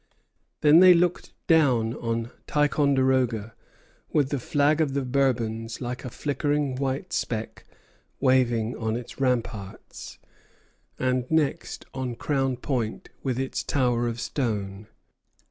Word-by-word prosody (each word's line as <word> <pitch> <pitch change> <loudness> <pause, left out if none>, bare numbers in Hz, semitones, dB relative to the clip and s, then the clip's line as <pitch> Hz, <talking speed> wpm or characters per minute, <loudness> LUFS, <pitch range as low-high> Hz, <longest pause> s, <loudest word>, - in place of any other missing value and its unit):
Then 150 +2 +7
they 180 -1 +8
looked 175 +1 0
down 130 -9 +3
on 115 0 -3 0.2
Ticonderoga, 130 -6 +1 0.6
with 145 -3 +2
the 140 - -1
flag 145 +4 +2
of 140 -3 0
the 140 -2 0
Bourbons, 115 -4 -1
like 125 0 -5
a 125 - -5
flickering 145 0 -1
white 135 +6 -3
speck, 110 -2 -3 0.5
waving 125 -4 +2
on 110 -1 -2
its 120 +2 -7
ramparts; 115 -6 -3 0.8
and 125 0 0
next 160 -3 -1
on 130 -2 -3
Crown 135 0 -1
Point 120 -4 -3
with 130 -3 -2
its 135 0 -2
tower 125 -3 +1
of 115 0 -3
stone. 105 -6 -3
130 Hz, 120 wpm, -26 LUFS, 115-140 Hz, 0.8 s, they